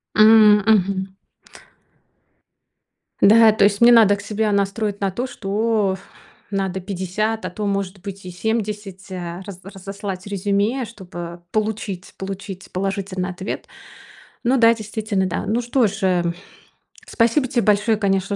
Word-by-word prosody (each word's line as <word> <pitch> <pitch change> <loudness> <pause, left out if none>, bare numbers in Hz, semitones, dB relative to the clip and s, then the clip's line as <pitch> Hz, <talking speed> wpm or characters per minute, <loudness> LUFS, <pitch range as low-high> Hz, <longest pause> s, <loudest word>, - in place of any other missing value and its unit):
М. 215 -1 +7
Мгм. 195 -2 +2 2.1
Да, 220 +2 +7
то 210 -1 +3
есть 205 +1 +1
мне 235 +1 +8
надо 220 -4 +6
к 200 - -9
себя 215 +1 -1
настроить 200 +1 -1
на 195 -1 0
то, 245 +7 -3
что 210 -2 -1 0.5
надо 190 -2 -2
50, 195 +3 -3
а 185 - -2
то 210 +4 -5
может 195 -1 -2
быть 195 -1 -8
и 180 - -6
70 210 -1 -3 0.4
раз 195 -3 -9
разослать 195 0 -7
резюме, 205 +5 0
чтобы 175 -5 -9
получить 210 -3 -3
получить 195 0 -7
положительный 190 -1 -3
ответ. 185 +2 -6 0.8
Ну 255 +2 +3
да, 230 -1 +6
действительно, 215 -2 -2
да. 180 -2 -3
Ну 230 +3 0
что 240 0 +2
ж, 200 +2 -5
э, 180 -2 +2 0.8
спасибо 235 +4 +1
тебе 240 -1 0
большое, 210 +1 +3
конечно, 195 -1 0
200 Hz, 135 wpm, -21 LUFS, 190-220 Hz, 2.1 s, мне